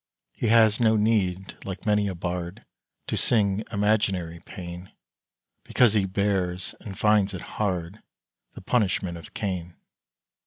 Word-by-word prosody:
He 120 - -2
has 110 -1 +5
no 110 -2 +4
need, 100 -4 +1
like 95 +2 -7
many 105 -1 +2
a 95 - -3
bard, 90 +1 -4 0.4
To - - -2
sing 105 -3 +2
imaginary 100 -5 0
pain, 90 +1 -9 0.7
Because 120 -4 +3
he 105 -3 +2
bears, 95 -2 -1
and 95 -4 -9
finds 105 -2 +3
it 90 - -6 0.2
hard, 95 -1 -2 0.5
The - - -10
punishment 95 -6 0
of 80 - -14
Cain. 90 -4 -3
95 Hz, 130 wpm, -26 LUFS, 90-105 Hz, 0.7 s, has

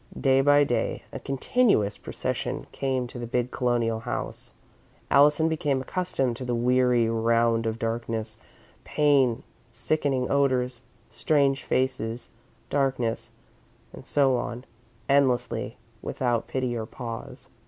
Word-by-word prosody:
Day 135 -1 +4
by 145 +1 +5
day, 125 -4 -1
a - - -5
continuous 135 - +1
procession - - -3
came 130 -2 -1
to 120 0 -9
the 120 - -5
big 125 +1 -1
Colonial 120 -3 0
house. 115 - -5 0.6
Allison 150 +3 +5
became 150 -4 0
accustomed 135 -5 -1
to 130 - -6
the 125 -1 -1
weary 125 -1 +3
round 115 0 +2
of 110 0 -2
darkness, 115 -1 -3 0.5
pain, 140 -6 +2 0.3
sickening 130 +2 0
odours, 130 -3 +1 0.3
strange 135 +3 +1
faces, 125 -3 -1 0.4
darkness, 130 -5 0 0.6
and - - -10
so 135 -3 +2
on, 120 +1 -5 0.4
endlessly, 130 -4 +1 0.2
without 120 -3 -1
pity 130 -2 -2
or 110 -1 -4
pause. 115 -3 -7
125 Hz, 120 wpm, -26 LUFS, 115-135 Hz, 0.6 s, by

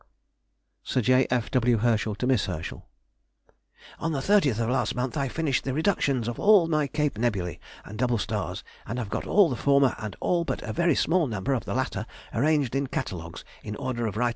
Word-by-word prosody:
SIR 130 - 0
J. 130 +3 +3
F. 125 -2 -1
W. 125 -2 +3
HERSCHEL 110 -1 +1
TO 125 - -3
MISS 125 -5 +2
HERSCHEL.... 85 -3 -6 1.1
On 165 - -1
the 150 - -1
30th 145 - +3
of 115 -1 0
last 130 - 0
month 125 +2 -2
I 140 -2 0
finished 145 0 -1
the 135 -1 -2
reductions 145 - +1
of 120 - -4
all 200 -5 +6
my 155 -3 +1
Cape 150 -5 -1
nebulæ 100 -7 -1 0.3
and 105 +1 -9
double 120 -1 +2
stars, 105 - -3 0.2
and 115 - -4
have 115 -5 -3
got - - -3
all 200 -3 +5
the 130 - -2
former 140 -1 +3
and 110 -3 -5
all 175 -1 +1
but - - -3
a - - -4
very 170 -3 +2
small 170 -2 +2
number 110 +3 -1
of 125 - -2
the - - -3
latter 115 -4 -2 0.3
arranged 145 0 +1
in 135 0 0
catalogues 85 -8 -5 0.2
in 105 -1 -6
order 120 0 -2
of 105 - -4
Rt. 120 +1 +2
125 Hz, 205 wpm, -26 LUFS, 110-150 Hz, 1.1 s, all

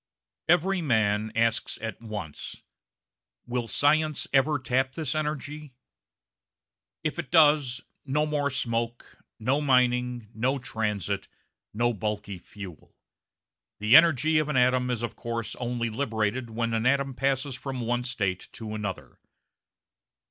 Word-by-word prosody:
Every 180 +2 +3
man 110 -6 +1
asks 115 -1 +1
at 110 +1 -5
once: 105 -9 -7 0.8
"Will 120 -1 -2
science 155 +3 +2
ever 145 +2 +4
tap 130 0 0
this 155 -1 -2
energy?" 150 -2 -4 1.3
If 155 +2 -2
it 165 - -4
does, 145 -5 +4 0.2
no 150 +2 +1
more 145 -2 0
smoke, 115 -2 -3 0.2
no 130 +6 +1
mining, 125 -4 +2
no 130 +5 0
transit, 105 - -2 0.4
no 120 +3 +1
bulky 105 -2 -4
fuel. 95 -3 -11 0.8
The 105 +4 +5
energy 155 -1 +6
of 155 -1 -1
an 150 - +1
atom 125 0 +3
is 120 -2 -1
of 115 -2 -3
course 115 -1 -4
only 120 -2 -2
liberated 115 -1 -1
when 115 +1 -2
an 115 +2 +1
atom 140 0 +2
passes 135 +1 0
from 130 0 -5
one 120 +1 0
state 100 -8 -2
to 110 -2 -6
another. 105 -4 -5
125 Hz, 125 wpm, -27 LUFS, 110-140 Hz, 1.3 s, energy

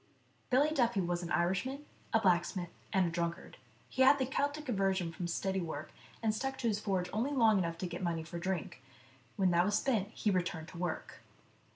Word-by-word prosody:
BILLY 280 +4 +4
DUFFY 240 -8 +2
was 175 0 -1
an 170 - -5
Irishman, 195 +12 0 0.3
a 225 - +4
blacksmith, 175 -2 +1 0.2
and 190 -2 +3
a - - 0
drunkard. 170 +1 -3 0.3
He 260 - -2
had 265 +2 +7
the 265 - +1
Keltic 285 +3 -1
aversion 195 -6 +1
from 170 +1 -4
steady 190 +2 -1
work, 155 -3 -5 0.3
and 220 -1 +2
stuck 270 +5 -2
to 235 - -1
his 210 -2 +1
forge 190 -4 0
only 230 +6 +1
long 225 -6 +5
enough 170 -2 -1
to 185 - -3
get 175 +1 -6
money 170 -3 -1
for 170 +1 -6
drink; 175 -7 -3 0.5
when 190 -2 +3
that 175 0 +4
was 205 +2 +2
spent, 220 -8 +1
he 215 -1 -1
returned 175 -3 -1
to 175 - -9
work. 175 -2 -4
190 Hz, 200 wpm, -33 LUFS, 175-230 Hz, 0.5 s, had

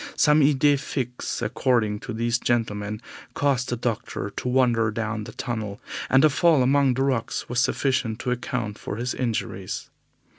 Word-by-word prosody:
Some 150 +1 +5
idee 145 0 +4
fixe, 125 -3 -4
according 110 -2 +1
to 120 - -7
these 115 +1 0
gentlemen, 105 -3 -1 0.3
caused 135 -3 +1
the 120 - -1
doctor 115 -3 -3
to 125 - -5
wander 120 -3 +3
down 110 -1 -3
the - - -8
tunnel, 110 -5 -4 0.3
and 135 +3 +6
a - - +6
fall 155 -1 +4
among 135 0 +3
the 135 - +1
rocks 130 -5 -1
was 120 0 -1
sufficient 130 -4 +1
to 125 - -1
account 120 -3 -3
for - - -5
his 120 +3 -2
injuries. 120 -4 -3
120 Hz, 160 wpm, -25 LUFS, 110-130 Hz, 0.3 s, and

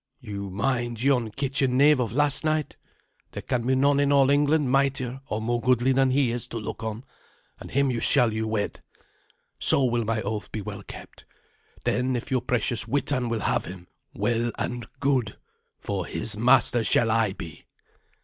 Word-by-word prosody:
You 100 -5 -6
mind 120 +3 -2
yon 130 -5 +2
kitchen 135 +1 -1
knave 145 0 +5
of 115 -4 -1
last 145 +3 +1
night? 155 -2 -1 0.6
There - - -6
can 120 -1 -2
be 130 - +3
none 140 +2 +3
in 145 0 +2
all 140 -1 +4
England 145 -1 +2
mightier 135 -1 0
or 105 - -2
more 120 +2 -1
goodly 125 +1 +2
than 135 0 +3
he 130 -2 +2
is 120 0 -3
to 115 - -6
look 105 - -6
on, 110 +2 -5 0.6
and - - -10
him 140 0 +1
shall 115 0 +5
you 110 0 -2
wed. 110 -2 -3 0.8
So 140 - +4
will 120 -2 +1
my 110 0 -1
oath 105 +1 -4
be 110 - -4
well 100 -1 -7
kept. - - -12 0.6
Then 125 +1 0
if 120 +3 -5
your 130 -2 +1
precious 115 -1 -1
Witan 130 -1 0
will 115 -2 -2
have - - 0
him, 90 -1 -9 0.3
well 120 0 -1
and 120 -2 -4
good, 130 -6 0 0.4
for - - -4
his 110 - -1
master 120 +1 +3
shall 115 0 +2
I 110 -3 +1
be." 80 -5 -10
120 Hz, 180 wpm, -25 LUFS, 110-135 Hz, 0.8 s, knave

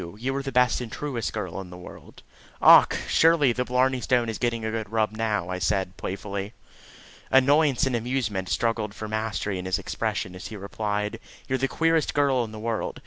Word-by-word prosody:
You 130 +4 -2
are 140 - -1
the 135 0 -5
best 125 -1 +3
and 115 -3 -6
truest 130 -7 -3
girl 95 -3 -4
in 90 - -10
the 90 - -10
world." 90 - -13 0.4
"Och! - - +7
Sure, 165 +1 +5
the 125 -5 +2
blarney 125 +1 +1
stone 120 -2 +1
is 110 - -4
getting 115 -2 -1
a 110 - -2
good 110 -2 -4
rub 110 -1 +1
now," 110 -5 -2
I 90 0 -3
said 95 0 -1
playfully. 100 +2 -5 0.8
Annoyance 140 +1 +4
and 130 -2 0
amusement 115 -6 -2
struggled 115 -3 -1
for 110 - -6
mastery 105 -3 -2
in 90 - -6
his 95 +1 0
expression 105 -1 -3
as 90 - -8
he 110 - -8
replied: 105 +2 -3 0.3
"You're 130 0 0
the 135 - +1
queerest 165 +2 +1
girl 140 -4 +2
in 110 - -7
the 110 - -8
world. 110 0 -3
115 Hz, 200 wpm, -25 LUFS, 105-130 Hz, 0.8 s, Och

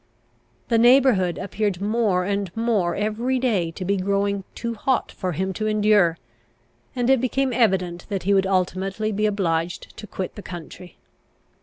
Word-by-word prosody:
The 230 - +3
neighbourhood 240 -7 +4
appeared 200 -1 -2
more 205 -3 +1
and 200 0 -1
more 210 -7 +1
every 220 +5 -1
day 215 -10 +1
to 175 +3 -7
be 200 +2 +1
growing 200 +1 0
too 235 0 -3
hot 255 +4 -1
for 185 -2 -3
him 190 +4 -2
to 215 +3 -2
endure, 210 -5 +3 0.8
and 245 -1 0
it 265 -2 +4
became 260 0 0
evident 185 -7 +1
that 195 -3 -3
he 200 +2 +2
would 195 -1 +3
ultimately 190 +3 -1
be 210 +1 +1
obliged 175 -4 -2
to 210 - -8
quit 190 -1 -5
the 205 - -9
country. 175 0 -10
200 Hz, 160 wpm, -23 LUFS, 185-225 Hz, 0.8 s, neighbourhood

